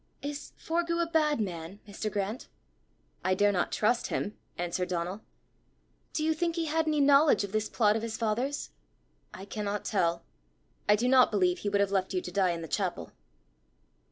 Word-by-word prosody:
"Is 285 0 -5
Forgue 335 +1 -1
a 340 - +2
bad 310 -4 +2
man, 180 -1 -4
Mr. 210 +1 -4
Grant?" 205 +4 -3 0.8
"I 185 0 +2
dare 205 +1 +4
not 180 -3 0
trust 230 +3 +1
him," 210 - -2 0.2
answered 175 +1 -2
Donal. 180 +3 -2 0.9
"Do 310 - -1
you 320 0 +2
think 335 +1 -1
he 335 -1 -1
had 320 +1 0
any 305 -1 +2
knowledge 280 -4 +5
of 200 - -5
this 215 0 -1
plot 210 -3 +3
of 225 - -1
his 225 -1 -4
father's?" 240 +6 -1 0.6
"I 190 - -9
cannot 205 0 -3
tell. 170 -4 +1 0.7
I 210 - +7
do 235 +4 0
not 255 0 +6
believe 180 -4 +2
he 205 - -2
would 200 0 +2
have 200 -1 +1
left 190 -1 0
you 180 - +1
to 180 - -6
die 190 0 +2
in 170 -1 -2
the - - -6
chapel." 180 - -2
210 Hz, 185 wpm, -29 LUFS, 190-285 Hz, 0.9 s, I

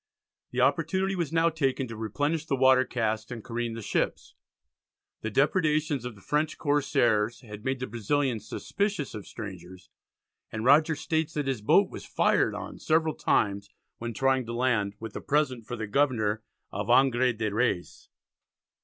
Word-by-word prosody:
The - - -1
opportunity 190 0 +1
was 170 -6 -2
now 165 0 +3
taken 135 -4 0
to 115 - -7
replenish 145 +9 -2
the - - +1
water 130 0 +5
casks, 110 -2 -2
and 120 -3 -7
careen 115 -1 -3
the 115 - -6
ships. - - -2 0.9
The 110 - -2
depredations 150 - +1
of 125 -3 -5
the 100 - -17
French 150 +1 0
corsairs 120 -6 +1
had 105 -3 -10
made 130 -1 -1
the 130 - -2
Brazilians 120 0 -1
suspicious 200 -7 -2
of 105 - -8
strangers, 95 -4 -9 0.6
and 110 +1 -4
Rogers 155 +3 +4
states 160 -1 -1
that 150 -1 -1
his 135 -5 -2
boat 105 - +4
was - - -8
fired - - +2
on - - -7
several 160 0 +2
times 100 -6 0 0.3
when 120 -1 -5
trying 135 -1 +1
to 115 - -4
land 115 -5 +1
"with 110 -2 -8
a - - -4
present 140 -6 0
for 120 - -4
the 110 -2 -4
Governor 110 -3 +1 0.3
of - - -4
Angre 130 -1 +4
de 110 -2 -1
Reys." 110 -6 -1
125 Hz, 165 wpm, -28 LUFS, 110-145 Hz, 0.9 s, water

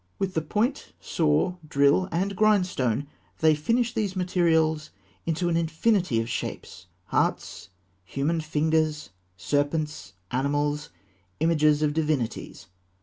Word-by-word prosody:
With 190 -1 -2
the 160 - 0
point, 225 - -1
saw, 160 +3 +1
drill, 140 +5 +3
and 195 +4 -1
grindstone, 180 - +2 0.3
they 160 -1 +4
fashioned 230 +11 +1
these 210 -5 -1
materials 160 -4 +1 0.4
into 170 +2 0
an 170 - +1
infinity 170 - +1
of 115 - -2
shapes 95 -5 -5 0.2
hearts, - - -1 0.3
human 145 - -1
fingers, 155 -3 0 0.3
serpents, 145 - -1 0.2
animals, 145 +3 -1 0.5
images 155 -2 +3
of 150 -1 +1
divinities. 150 -7 -2
155 Hz, 110 wpm, -26 LUFS, 145-180 Hz, 0.5 s, they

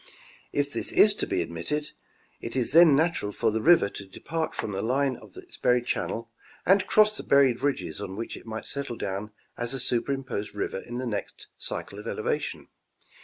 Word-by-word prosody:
If 145 0 -1
this 210 - +4
be - - 0
admitted, 145 - -3 0.5
it 115 - -6
is 125 -3 0
then 165 -1 +8
natural 155 -9 +1
for 105 - +1
the 110 +1 -1
river 165 -7 +6
to 100 -1 -9
depart 160 +11 -4
from 105 - -3
the 95 0 -2
line 130 +3 +1
of - - -15
its 360 -2 -11
buried 125 -1 +2
channel 115 -1 -2 0.3
and 195 +1 +4
cross 215 0 +5
the - - -4
buried 135 -3 +4
ridges 100 - -1
on 95 -2 -5
which 115 +3 -5
it - - -12
might 110 0 -5
settle 140 -4 -3
down 100 +1 -3 0.3
as 120 +2 -2
a - - -4
superimposed 125 -4 -2
river 100 - -2
in 120 +4 -7
the 130 - -3
next 105 -4 -5
cycle - - -4
of - - -8
elevation. - - -2
125 Hz, 185 wpm, -27 LUFS, 105-145 Hz, 0.5 s, then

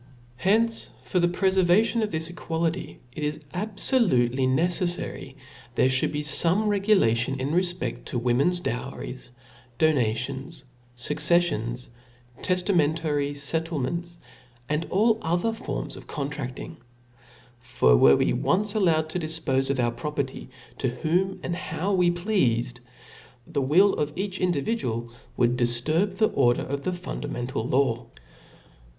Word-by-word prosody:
Hence, 220 - +1
for 185 - 0
the 175 - +3
prefer 190 +2 +2
vation 210 +6 +3
of 215 - 0
tfiis 160 0 -3
equality, 165 +1 -3
it 150 - -6
is 150 0 -1 0.2
abfolutely 180 - +2
neceflary 175 -2 -1 0.4
there 130 - +4
ftiould 130 0 +2
be 150 0 -3
fome 175 +7 +2
regulation 135 - +2
in 135 +3 -2
refpcft 180 +1 -1
to 125 - -3
women's 130 +9 +1
dowries, 130 -2 -5 0.5
donations, 135 +1 0 0.3
fuc 145 +5 -1
ceffions, 150 -8 +1 0.5
teftamentary 160 -5 +1
fettlements, 165 +3 -3 0.5
and 150 +3 -1
all 220 +3 +3
other 175 +7 0
forms 225 - -5
of - - -12
contrafting. 145 +2 -5 0.8
For 120 - +3
were 70 +3 +6
it - - +2
once 205 +2 +1
allowed 165 -7 +2
to 180 - -2
difpofe 155 -5 -1
of 140 -2 0
our 120 -1 +2
property 140 0 -4 0.3
to 130 - +1
whom 175 +9 0
and 175 - -2
how 170 +4 -2
we 180 -2 +4
pleafed, 130 - 0 0.7
the 145 -1 -2
will 175 +10 +4
of 150 0 -2
each 190 0 -3
individual 140 - -1 0.3
would 120 0 +3
difturb 155 +11 +1
the 215 - +3
order 120 -3 +2
of 140 +1 -3
the 185 +5 -2
fundamental 135 -8 -4
law. 120 -2 +1
155 Hz, 130 wpm, -26 LUFS, 130-180 Hz, 0.8 s, were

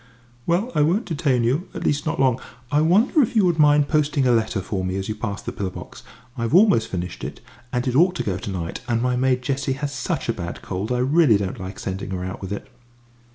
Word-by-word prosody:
"Well, 190 +9 +1
I 150 - +2
won't 180 +10 +2
detain 145 -7 +1
you 135 +10 0
at - - -4
least, 145 +2 0
not - - -1
long. 130 -2 +3 0.3
I 150 +1 +3
wonder 210 - +4
if 240 -2 0
you 210 -4 +5
would 170 -3 +1
mind 145 -1 +5
posting 145 -3 +1
a 125 - +4
letter 115 -3 +1
for 95 0 -3
me 95 0 -2
as 95 0 -3
you 110 - -2
pass 105 -2 -5
the - - -4
pillar 95 -2 -3
box? - - -10 0.3
I've 115 +5 -1
almost 185 - +5
finished 90 -1 -5
it, - - -6 0.3
and 125 0 -1
it 125 - 0
ought 180 +5 +4
to - - -2
go 95 -2 -2
to - - -6
night, 85 -4 -4
and 115 -2 +1
my 125 +1 +1
maid 125 0 +1
Jessie 135 +1 -1
has 140 +1 -4
such - - -3
a - - +1
bad 85 0 -6
cold 100 +5 -4
I 125 - +1
really 135 -2 +4
don't 100 -2 -4
like 95 +2 -7
sending 95 +1 -5
her 90 -1 -3
out 95 - -6
with 95 0 -6
it." 100 - -5
125 Hz, 245 wpm, -23 LUFS, 100-155 Hz, 0.3 s, you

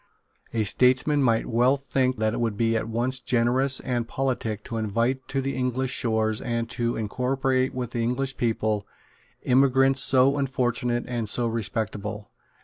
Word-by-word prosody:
A 115 -1 0
statesman 130 +7 +3
might 115 -4 +2
well 125 +4 +2
think 130 -2 -1
that 110 0 0
it - - -3
would 115 -3 -1
be 115 0 +1
at 115 0 -2
once 125 +3 -1
generous 130 +2 +2
and 120 -2 -2
politic 120 -5 -2
to 115 - -5
invite 115 +5 -1
to 135 - -1
the 135 0 -3
English 130 0 -1
shores 110 -4 0
and 115 -1 -2
to 120 0 -1
incorporate 130 +4 -1
with 125 -2 -4
the 120 - -2
English 130 +3 -1
people 110 -3 -1 0.6
emigrants 135 +1 +4
so 135 +1 +4
unfortunate 120 -2 -1
and 120 -4 -3
so 120 +2 +1
respectable. 110 -2 -4
120 Hz, 155 wpm, -25 LUFS, 115-130 Hz, 0.6 s, emigrants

